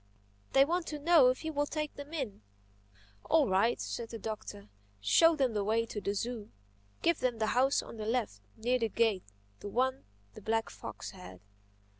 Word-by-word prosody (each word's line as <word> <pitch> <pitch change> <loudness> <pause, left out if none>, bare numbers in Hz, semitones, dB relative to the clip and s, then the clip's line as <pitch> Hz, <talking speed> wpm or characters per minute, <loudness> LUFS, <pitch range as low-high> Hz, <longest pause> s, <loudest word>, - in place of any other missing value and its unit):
They 270 0 +7
want 345 +2 -1
to 300 - -4
know 305 -2 +6
if 255 +5 0
you 315 - -2
will 290 0 0
take 305 -1 -3
them 285 +1 -9
in." 265 - -4 0.8
"All 315 -4 +4
right," 195 +5 +2
said 230 -1 -4
the 230 - -6
Doctor. 210 - -6 0.3
"Show 325 - +5
them 265 -5 +1
the 205 -1 0
way 225 +3 +1
to 210 -2 -5
the 200 +1 -1
zoo. 230 0 -4 0.5
Give 335 -1 +3
them 250 -2 0
the 220 -1 0
house 265 +3 +3
on - - -10
the 215 0 -4
left, 225 - -1 0.2
near 245 +3 +1
the 225 -1 0
gate—the 180 - -2
one 260 +4 0 0.3
the - - -11
black 225 0 -1
fox - - -8
had. 90 0 -11
235 Hz, 185 wpm, -32 LUFS, 210-285 Hz, 0.8 s, They